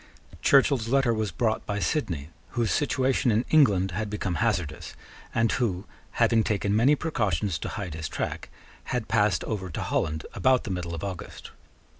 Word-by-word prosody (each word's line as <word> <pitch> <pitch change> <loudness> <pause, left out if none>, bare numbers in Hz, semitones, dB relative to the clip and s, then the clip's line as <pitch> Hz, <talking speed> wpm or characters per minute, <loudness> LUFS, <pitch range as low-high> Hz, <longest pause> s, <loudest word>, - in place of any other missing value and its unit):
Churchill's 135 -4 +4
letter 135 -1 +3
was 110 -2 -1
brought 110 +6 -1
by 105 - -2
Sidney, 85 - -1 0.3
whose 115 -2 +1
situation 135 -3 +1
in 115 +2 +2
England 100 - +4
had 105 +4 -3
become 100 -3 -2
hazardous, 95 -10 -1 0.4
and 115 -1 +2
who, 100 -6 -1 0.3
having 115 -1 +3
taken 100 -1 0
many 130 +7 +5
precautions 105 - -1
to - - -4
hide 95 -5 -5
his 80 -1 -5
track, - - -4 0.4
had 125 -3 -2
passed 105 -2 +2
over 95 -4 -4
to 80 - -4
Holland 80 0 -1
about 130 -1 +3
the 105 - -4
middle 90 -2 -3
of 85 - -7
August. 95 -3 -7
105 Hz, 165 wpm, -26 LUFS, 90-120 Hz, 0.4 s, many